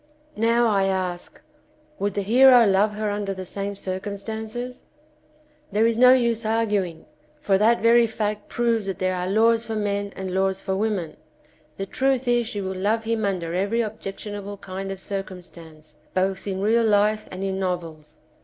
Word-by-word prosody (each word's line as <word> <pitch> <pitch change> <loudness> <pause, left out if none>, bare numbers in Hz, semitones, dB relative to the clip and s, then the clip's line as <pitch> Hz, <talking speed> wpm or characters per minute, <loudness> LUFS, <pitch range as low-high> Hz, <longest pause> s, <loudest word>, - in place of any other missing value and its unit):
Now 230 +2 +2
I 200 -3 +2
ask 185 -2 -3 0.6
would 200 -1 -1
the 200 - -1
hero 245 +3 +7
love 205 +1 +3
her 210 0 -2
under 205 -1 -3
the 185 0 -6
same 200 +2 -4
circumstances? 220 +6 -5 0.9
There 210 +3 +2
is 230 0 +2
no 250 +2 +7
use 235 -3 +2
arguing, 210 -6 -1 0.3
for 195 -10 +2
that 225 +3 +3
very 235 0 +5
fact 210 -1 -3
proves 230 -4 0
that 190 -3 -3
there 185 0 0
are 180 0 -2
laws 225 +3 +3
for 225 -1 -4
men 200 -1 -2
and 190 -1 -5
laws 190 0 +1
for 190 - -2
women. 195 -6 -2 0.6
The 195 - -3
truth 265 +4 0
is 240 -1 +2
she 215 -3 -4
will 190 0 -4
love 215 +4 0
him 225 -1 -1
under 175 -4 -2
every 200 +6 0
objectionable 205 -1 -6
kind 195 0 -6
of 195 - -6
circumstance, 175 -5 -8 0.2
both 190 +1 -1
in 190 0 -2
real 230 +3 +3
life 215 0 +2
and 185 +1 -6
in 190 0 -2
novels. 165 -5 -4
205 Hz, 170 wpm, -24 LUFS, 190-225 Hz, 0.9 s, hero